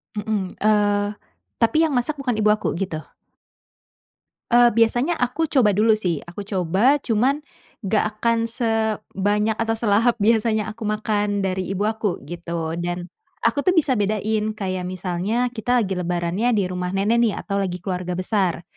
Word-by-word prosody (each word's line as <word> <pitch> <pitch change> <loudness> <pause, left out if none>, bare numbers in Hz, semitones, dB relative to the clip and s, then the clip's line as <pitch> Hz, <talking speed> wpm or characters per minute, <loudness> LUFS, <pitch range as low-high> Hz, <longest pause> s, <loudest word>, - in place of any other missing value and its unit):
Mhm. 205 -3 -2
Eee, 205 -1 +2 0.5
tapi 230 +6 +2
yang 315 -3 +2
masak 245 +5 0
bukan 245 -5 -1
ibu 215 0 +3
aku, 215 - -2
gitu. 170 -4 -3 1.5
Eee, 240 0 +7
biasanya 240 +8 +2
aku 250 +6 0
coba 260 -8 +3
dulu 215 +3 +4
sih. 180 -7 -1
Aku 175 +4 -7
coba, 195 - +2
cuman, 255 +5 +1 0.4
nggak 210 +2 +2
akan 230 +1 +1
sebanyak 220 -2 0
atau 225 0 0
selahap 225 +2 +2
biasanya 220 0 +2
aku 225 +2 -9
makan 210 -1 0
dari 185 -1 -1
ibu 195 +1 -2
aku 220 -2 -1
gitu 170 0 -4
dan 175 +1 -4 0.3
aku 285 - +2
tuh 365 +6 +2
bisa 310 -5 +3
bedain 215 +1 0
kayak 185 -3 -3
misalnya 185 +7 -1
kita 245 +1 +1
lagi 195 - -5
lebarannya 180 +7 0
di 205 - +2
rumah 180 +1 -3
nenek 210 +4 +2
nih 230 -3 +2
atau 200 -1 -2
lagi 180 -2 -3
keluarga 180 -2 -3
besar, 185 -2 0
210 Hz, 155 wpm, -22 LUFS, 185-230 Hz, 1.5 s, Eee